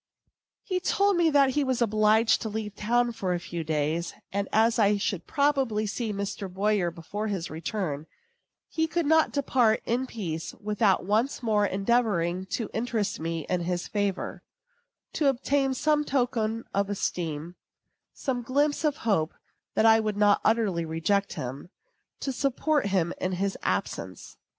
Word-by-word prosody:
He 370 -3 -1
told 400 +2 +2
me 340 -2 +4
that 280 -3 +4
he 290 +2 +1
was 260 -2 0
obliged 220 0 +3
to 220 - -3
leave 210 -1 -4
town 240 +3 +1
for 190 -6 -2
a - - -2
few 170 -1 -5
days; 155 +2 -1 0.2
and 200 0 -1
as 225 +1 +3
I 205 -1 +4
should 195 -3 -2
probably 270 -7 +1
see 215 +2 -2
Mr. 200 -1 -4
Boyer 195 -1 +1
before 170 +6 -5
his 190 -5 -3
return, 160 -2 -3 0.6
he 320 0 0
could 340 0 -1
not 320 +1 +4
depart 250 -6 +2
in 250 +3 0
peace 170 -9 -5
without 210 -3 +1
once 225 +7 0
more 210 -3 +2
endeavoring 195 -4 +1
to 220 +3 -3
interest 225 -2 -1
me 165 -1 -3
in 180 - 0
his 175 0 -2
favor, 205 -2 -2 0.7
to 300 - +1
obtain 270 +1 +1
some 300 +2 +2
token 235 -5 0
of 200 0 0
esteem, 170 -5 -3 0.6
some 255 -3 -3
glimpse 285 +6 +1
of 300 -2 +1
hope 170 -8 +1 0.4
that 220 - +3
I 225 0 +7
would 215 -2 -2
not 205 -1 +4
utterly 215 -6 +2
reject 165 +5 0
him, 130 +6 -6 0.5
to 275 - -1
support 275 0 0
him 185 -4 +1
in 185 0 -1
his 195 +2 -1
absence. - - -3
215 Hz, 155 wpm, -27 LUFS, 185-250 Hz, 0.7 s, I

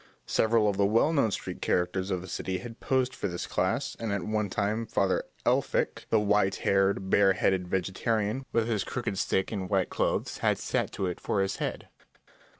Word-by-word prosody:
Several 110 -1 +3
of 100 -2 0
the 100 - +3
well 115 +10 +3
known 140 -8 +3
street - - -5
characters 95 +2 0
of 90 -2 -1
the - - -9
city 95 +1 -3
had 115 +3 -9
posed 130 -1 +1
for - - -3
this 90 -1 -4
class, - - -1
and 115 -2 -2
at 100 -3 -1
one 105 0 -1
time 105 +4 -1
Father 100 -4 +1 0.2
Elphick, - - 0
the 110 - +4
white 105 -2 +2
haired, 95 0 +2
bare 100 -1 +5
headed 95 -1 +1
vegetarian, 105 +6 -1
with 115 -1 +1
his 110 -4 0
crooked 115 -6 -3
stick 95 -1 0
and 95 -4 -3
white 95 -3 +1
clothes, - - -1
had - - +2
sat - - -1
to 95 - -2
it 90 -1 -3
for 100 - -1
his 95 - -2
head. - - -4
100 Hz, 195 wpm, -28 LUFS, 95-110 Hz, 0.2 s, bare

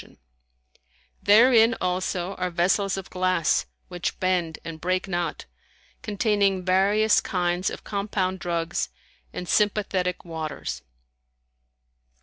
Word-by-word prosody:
[FN#156] - - -18 1.1
Therein, 225 +1 +6
also, 180 0 -1
are 180 0 -1
vessels 190 +3 +1
of 195 - -7
glass 185 -3 +1 0.2
which 175 -2 -4
bend 180 -3 0
and 160 -1 -7
break 185 +2 0
not, 175 -3 -3 0.6
containing 200 -3 +1
various 200 +4 +3
kinds 175 0 0
of - - -8
compound 200 -2 -2
drugs 170 0 -2 0.4
and 180 - -6
sympathetic 195 -4 0
waters. 160 -3 -5
185 Hz, 105 wpm, -25 LUFS, 175-200 Hz, 1.1 s, Therein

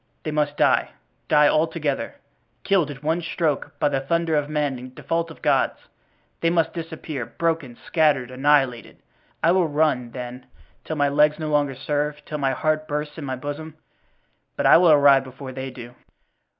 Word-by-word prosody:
They 155 - -3
must 150 -1 -1
die—die 150 - +1
all 155 +2 +3
together—killed 160 +2 -3
at 140 0 -9
one 160 +3 0
stroke 160 -3 -2
by - - +2
the 135 - 0
thunder 165 +3 0
of 145 -1 0
men 145 -4 -1
in 130 +1 -11
default 165 +4 -2
of 160 - -14
God's. - - +2 0.6
They 165 - +2
must 165 -1 +1
disappear, 160 -5 -5
broken, 160 -7 -2
scattered, 145 -6 +2
annihilated. 135 -2 +1 0.5
I 165 - +5
will 180 -2 +3
run, 145 -5 +1
then, 125 +1 -8 0.4
till 160 - -3
my 145 -1 +2
legs 150 +1 +3
no 155 -1 -4
longer 145 -2 +1
serve, 150 +2 -2
till 150 - -5
my 135 -1 +1
heart 155 +2 0
bursts 150 +1 -4
in 150 - -6
my 130 -1 -3
bosom 145 +4 -6 0.8
but - - -2
I - - +8
will 175 0 +5
arrive 140 -2 +6
before 130 0 -9
they 130 0 -5
do." 120 -1 -10
150 Hz, 170 wpm, -23 LUFS, 135-160 Hz, 0.8 s, I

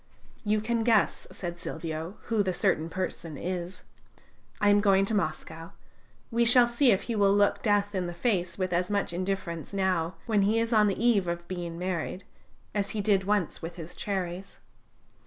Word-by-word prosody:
"You 210 0 +1
can 230 +1 0
guess," 220 -3 +2
said 175 -2 -6
Silvio, 160 +3 -5
"who 225 -3 +1
the 190 -2 0
certain 175 -5 +1
person 170 -3 -4
is. 180 0 -5 0.8
I 205 - +4
am 205 0 +5
going 195 -1 +4
to 220 - -3
Moscow. 165 -3 -3 0.6
We 235 +1 +2
shall 240 +1 +6
see 240 +3 +3
if 195 - +1
he 235 - -3
will 200 -1 +4
look 205 0 +3
death 205 -2 +1
in 185 -2 -1
the 175 - -5
face 175 -3 0
with 185 -2 -1
as 180 +1 0
much 200 -4 0
indifference 185 -2 -3
now, 185 -3 0
when 215 -3 +2
he 210 +3 +2
is 230 +1 0
on 210 -1 +5
the 195 - -1
eve 220 -5 +3
of 170 0 -3
being 175 -2 -5
married, 180 +1 -3 0.5
as 200 -1 -1
he - - +1
did 195 -2 +2
once 205 -4 0
with 165 +1 -6
his 170 -1 -8
cherries!" 190 -1 -4
195 Hz, 185 wpm, -28 LUFS, 175-210 Hz, 0.8 s, shall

